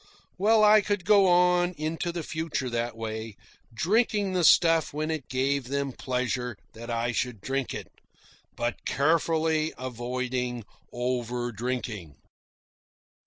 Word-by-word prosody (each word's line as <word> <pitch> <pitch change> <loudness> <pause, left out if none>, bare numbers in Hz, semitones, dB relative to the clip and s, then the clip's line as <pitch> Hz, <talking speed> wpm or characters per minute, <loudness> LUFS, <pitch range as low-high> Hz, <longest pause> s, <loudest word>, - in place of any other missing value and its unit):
Well, 215 +2 +4
I 210 0 +7
could 205 -3 -2
go 200 -1 +6
on 180 0 +4
into 160 +3 -2
the 170 -1 -4
future 155 -5 -3
that 120 -1 -2
way, 110 -1 -5 0.4
drinking 200 - +1
the 180 -1 +1
stuff 165 -1 +5
when 155 +1 -1
it 155 -5 -5
gave 135 +1 0
them 140 0 -2
pleasure 125 -2 -2 0.2
that 115 +2 -9
I 115 +1 -1
should 120 -1 -2
drink 135 +5 -2
it, - - -6 0.7
but 120 0 -3
carefully 160 +2 +1
avoiding 125 -1 -3 0.3
over 120 0 -2
drinking. 110 - -4
130 Hz, 125 wpm, -27 LUFS, 120-165 Hz, 0.7 s, I